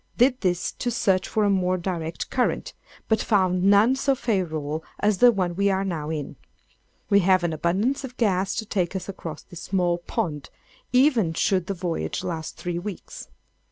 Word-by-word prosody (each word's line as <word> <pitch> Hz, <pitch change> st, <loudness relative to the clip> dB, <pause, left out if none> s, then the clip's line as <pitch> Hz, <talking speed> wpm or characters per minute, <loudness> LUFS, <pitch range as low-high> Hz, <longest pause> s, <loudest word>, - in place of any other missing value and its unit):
Did 250 Hz, +1 st, +3 dB
this 180 Hz, -2 st, 0 dB
to 245 Hz, -, -1 dB
search 195 Hz, -5 st, +1 dB
for 215 Hz, -, 0 dB
a 205 Hz, -, +3 dB
more 185 Hz, -1 st, +1 dB
direct 170 Hz, -2 st, -4 dB
current, 250 Hz, -, 0 dB, 0.3 s
but 220 Hz, -1 st, +2 dB
found 185 Hz, -3 st, +2 dB
none 205 Hz, +6 st, +5 dB
so 270 Hz, 0 st, +1 dB
favorable 160 Hz, -, -2 dB, 0.2 s
as 205 Hz, -2 st, +1 dB
the 245 Hz, 0 st, +8 dB
one 180 Hz, -5 st, -1 dB
we 200 Hz, +2 st, +2 dB
are 195 Hz, 0 st, 0 dB
now 160 Hz, -5 st, -3 dB
in. 150 Hz, -3 st, -4 dB, 0.7 s
We 200 Hz, -, +6 dB
have 185 Hz, -1 st, +3 dB
an 170 Hz, -2 st, 0 dB
abundance 200 Hz, -, 0 dB
of 255 Hz, -1 st, -8 dB
gas 195 Hz, -3 st, +1 dB
to 220 Hz, -, -3 dB
take 190 Hz, -3 st, -1 dB
us 190 Hz, -, -4 dB
across 165 Hz, -5 st, -7 dB
this 175 Hz, -2 st, -11 dB
small 180 Hz, -2 st, 0 dB
pond, 150 Hz, -4 st, -3 dB, 0.4 s
even 250 Hz, -, +3 dB
should 185 Hz, -1 st, +1 dB
the 195 Hz, -, -2 dB
voyage 165 Hz, -, -3 dB
last 160 Hz, -3 st, -5 dB
three 175 Hz, -1 st, -3 dB
weeks. 195 Hz, 0 st, -8 dB
185 Hz, 180 wpm, -24 LUFS, 170-210 Hz, 0.7 s, the